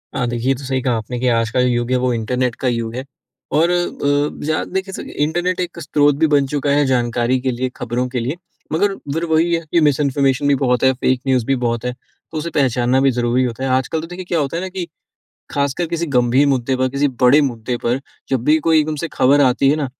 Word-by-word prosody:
हाँ, 125 - 0
देखिए 120 +1 -3
ये - - +4
तो 135 - -10
सही 130 0 -1
कहा 125 -1 0
आपने 115 +3 -5
कि 130 - 0
आज 115 -1 +1
का 125 - 0
युग 120 -1 +1
है 130 - +3
वो 125 0 0
इंटरनेट 125 +2 -1
का 130 - 0
युग 115 -2 -2
है। 130 - -4 0.5
और 165 +2 +4
अ, 145 -5 0
ज़्याद 155 +1 -1
देखिए 190 0 -2
सब - - -7
इंटरनेट 175 +5 -1
एक 175 -1 -4
स्रोत 145 -2 +2
भी 160 - +4
बन 145 -2 +3
चुका 145 0 -2
है 145 0 +3
जानकारी 120 -1 +1
के 130 0 -1
लिए, 125 +1 -2
खबरों 125 +1 -2
के 125 0 -2
लिए। 125 +6 -2 0.4
मगर 195 +5 +1 0.2
फिर 165 +2 -1
वही 165 +1 +2
है 165 - +2
कि 170 - +4
मिसइन्फॉर्मेशन 140 -2 +2
भी 140 - +4
बहुत 125 -2 +1
है, 130 - +6
फ़ेक 130 0 0
न्यूज़ 130 -3 +2
भी 135 - +1
बहुत 120 -2 -2
है, 125 - 0
तो 155 +4 -13
उसे 160 +2 -3
पहचानना 130 -4 +1
भी 135 0 +4
ज़रूरी 120 +1 +1
होता 125 +1 -3
है। 135 - -1
आजकल 130 +5 0
तो 165 - -7
देखिए 180 +1 -8
क्या 175 -2 0
होता 145 +3 -2
है - - -3
ना 190 - -4
कि 185 -2 -5 0.6
खासकर 140 +4 -1
किसी 170 +1 -2
गंभीर 125 +3 +3
मुद्दे 130 -1 +1
पर, 130 0 0
किसी 140 +2 +1
बड़े 130 +4 +6
मुद्दे 120 -3 -2
पर, 120 +2 +1 0.3
जब 130 -3 0
भी 155 +4 +4
कोई 160 -1 +5
एकदम 155 0 -1
से 160 +3 -3
खबर 140 +3 +4
आती 135 0 +3
है 145 - +3
ना, 150 -2 -1
135 Hz, 245 wpm, -19 LUFS, 125-150 Hz, 0.6 s, है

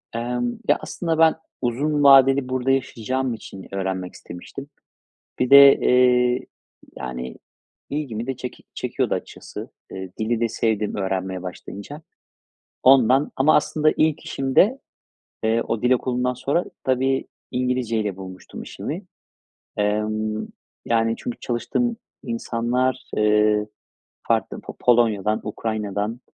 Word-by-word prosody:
Emm, 120 +1 -1 0.2
ya 145 - +4
aslında 165 -2 -3
ben 160 -1 +5 0.3
uzun 145 +5 0
vadeli 135 -1 +6
burada 130 +1 0
yaşayacağım 130 -1 -1
için 95 -3 -10
öğrenmek 95 -1 -3
istemiştim. 135 +11 -10 0.7
Bir 125 +1 0
de, 140 0 +10
eee, 125 0 +3 0.5
yani 65 0 -6 0.5
ilgimi 130 -6 -3
de 135 -2 -3
çek 125 -1 -7 0.2
çekiyordu - - -1
açıkçası, - - -7 0.2
eee, 95 -1 -7
dili 110 +1 0
de 115 - +2
sevdim 110 -2 -1
öğrenmeye 95 -1 -2
başlayınca. 100 - -8 0.8
Ondan 130 +1 +5
ama 145 +4 +5
aslında 155 0 +2
ilk 155 -1 +2
işimde, 185 - +2 0.7
eee, 115 +1 +2
o 115 -1 -1
dil 125 - +2
okulundan 125 0 0
sonra 140 +7 0 0.2
tabii 130 +1 +1 0.2
İngilizce 125 -3 0
ile 100 -3 -2
bulmuştum 95 -1 -9
işimi. 170 +7 -6 0.7
Emm, 110 +1 -1 0.4
yani 115 -1 +2
çünkü 120 - -6
çalıştığım 230 - -1 0.3
insanlar, 120 +1 -1
ııı, 105 0 +3 0.6
farklı - - 0
po - - -10
Polonya'dan, 110 -4 +2
Ukrayna'dan, 105 +1 -3
120 Hz, 115 wpm, -23 LUFS, 105-135 Hz, 0.8 s, de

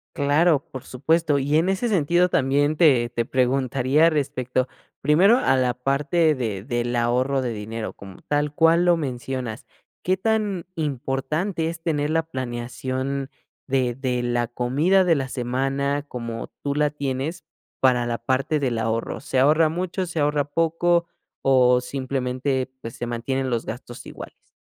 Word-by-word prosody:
Claro, 150 +1 +3
por 130 - -7
supuesto. 155 +3 +1
Y 145 +3 +1
en 175 +4 +2
ese 195 +5 0
sentido 180 -2 +2
también 145 +2 +2
te 130 -8 +4
te 115 0 -2
preguntaría 130 +4 +2
respecto, 130 -4 -1 0.3
primero 180 - +5
a 135 - +2
la 125 -1 +1
parte 145 +5 +1
de 105 -6 -3
del 120 -1 -2
ahorro 125 +3 +1
de 120 -2 -2
dinero 110 +1 -5
como 95 -2 -13
tal 145 0 0
cual 165 +2 +4
lo 175 -1 +4
mencionas, 130 -5 -4 0.4
¿qué 185 +1 +1
tan 210 -3 0
importante 155 +4 -2
es 165 0 -7
tener 150 -3 -1
la 165 0 +1
planeación 130 0 -4 0.4
de 130 -2 +1
de 125 -1 -2
la 120 0 0
comida 140 +11 +2
de 170 -3 +3
la 135 -2 -2
semana 135 +3 -1
como 115 -3 -5 0.2
tú 140 -1 -1
la 150 0 +2
tienes 145 +3 -4 0.3
para 125 -2 +3
la 120 -1 -1
parte 135 +5 0
del 125 -5 -1
ahorro? 115 +1 -2
¿Se 135 - -3
ahorra 155 +4 +4
mucho, 180 +2 -3
se 165 -2 -4
ahorra 145 0 +2
poco 165 +3 +1 0.4
o 125 -2 +4
simplemente, 130 0 -2
pues, 115 - -7
se 120 - -3
mantienen 130 +3 -2
los 115 -1 -1
gastos 120 +1 -8
iguales? - - -11
135 Hz, 155 wpm, -23 LUFS, 125-160 Hz, 0.4 s, primero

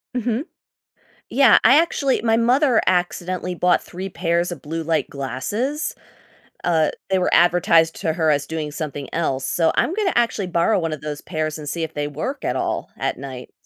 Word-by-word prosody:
Mhm. 245 +1 -1 0.9
Yeah. 265 -4 +6
I 260 +6 +7
actually 285 -5 +1
My 225 -1 +2
mother 245 +1 +3
accidentally 180 0 -1
bought 180 +1 +2
3 190 +2 -7
pairs 170 0 0
of 165 -6 -7
blue-light 160 +2 -2
glasses. 205 - -3 0.7
Uh, 160 -3 +2 0.2
they 190 -1 +2
were 180 - 0
advertised 170 -2 +4
to 160 -5 0
her 160 -2 +2
as 145 -1 0
doing 155 -2 -4
something 145 -2 -5
else, 135 -5 -1
so, 165 +4 +2
I'm 330 - +1
gonna 410 -2 0
actually 230 -5 +1
borrow 180 +4 +2
one 165 -2 -2
of 155 - -7
those 150 -1 -5
pairs 155 -2 -3
and 150 -1 -8
see 165 +2 -3
if 160 0 -5
they 145 -1 -2
work 225 - -5
at - - 0
all, - - -2
at - - -2
night. 130 -2 -8
170 Hz, 180 wpm, -21 LUFS, 155-220 Hz, 0.9 s, I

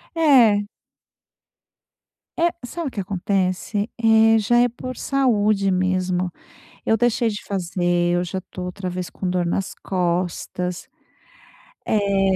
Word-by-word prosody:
É. 240 -11 +5 1.7
É. 340 +1 +3
Sabe 320 +5 -4
o - - -18
que 205 - -3
acontece? 195 +2 -1
Eh, 225 -1 +5
já 240 +3 +2
é 245 0 +4
por 255 +2 -7
saúde, 215 -8 +1
mesmo. 185 -1 0 0.5
Eu 225 - +2
deixei 240 0 +2
de 210 -1 -6
fazer, 175 -2 0
eu 175 - +1
já 185 +2 -4
estou, 185 0 -8
outra 180 +1 -5
vez, 180 0 -4
com 185 - -4
dor 180 -1 0
nas 185 +2 -2
costas. 180 0 -2 1.0
Eh 195 -2 +2
195 Hz, 125 wpm, -22 LUFS, 180-225 Hz, 1.7 s, É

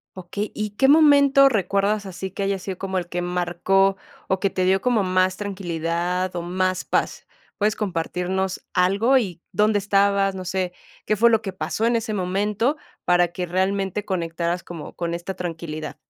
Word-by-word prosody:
Okey, 190 +3 -5
¿y 215 -1 -3
qué 265 +6 +2
momento 280 -2 +6
recuerdas 205 -2 +1
así 190 0 -6
que 200 +2 -4
haya 195 0 0
sido 190 0 -6
como 190 0 -3
el 175 -2 -2
que 175 0 -3
marcó, 180 +2 +1 0.3
o, 190 0 0
que 195 - +2
te 185 -1 -1
dio 190 +1 +3
como 240 -3 +2
más 185 0 +1
tranquilidad 180 -2 -2
o 175 - -2
más 185 +2 -1
paz? - - -1 0.3
¿Puedes 210 0 +1
compartirnos 185 0 -2
algo? 200 +9 +3
Y, 185 -9 -2
¿dónde 210 +2 +3
estabas? 200 -1 +2
No 185 - -5
sé. 185 0 -2 0.3
¿Qué 215 - +1
fue 235 +3 +5
lo 225 -2 +3
que 195 -4 -5
pasó 215 +4 -2
en 235 - +2
ese 225 -1 -1
momento 205 +7 0 0.3
para 175 0 +3
que 180 +1 -4
realmente 190 +2 -1
conectaras 170 -2 -2
como 170 -3 -8
con 170 -1 -2
esta 175 +3 -4
tranquilidad? 165 -3 -5
190 Hz, 175 wpm, -23 LUFS, 180-205 Hz, 0.3 s, momento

